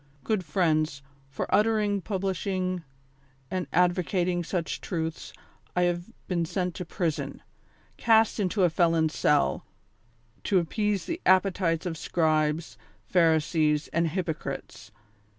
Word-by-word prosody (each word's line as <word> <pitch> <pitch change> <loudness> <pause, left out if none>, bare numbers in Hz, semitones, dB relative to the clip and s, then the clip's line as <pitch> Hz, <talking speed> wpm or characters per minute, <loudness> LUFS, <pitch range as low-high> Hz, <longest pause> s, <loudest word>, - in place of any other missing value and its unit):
'' 140 - -32
Good 215 -4 0
friends, 155 -4 0 0.3
for 140 - -3
uttering, 210 -2 +2
publishing 185 -1 -2 0.7
and 185 -2 -2
advocating 180 0 +1
such 170 0 -3
truths, 160 -3 -4 0.4
I 180 - +3
have 175 +3 -1 0.2
been 175 -2 0
sent 180 +2 -2
to 180 - -4
prison; 165 -2 -3 0.5
cast 225 -1 +4
into 195 0 +1
a 175 - +4
felon's 165 -2 +2
cell, 145 -1 +2 0.8
to 195 - +3
appease 205 +3 0
the 335 +2 -4
appetites 185 -3 +2
of 165 -3 -3
scribes, 155 -7 0 0.3
pharisees 160 -1 +2
and 170 0 +1
hypocrites. 160 -1 -4
175 Hz, 115 wpm, -27 LUFS, 160-190 Hz, 0.8 s, cast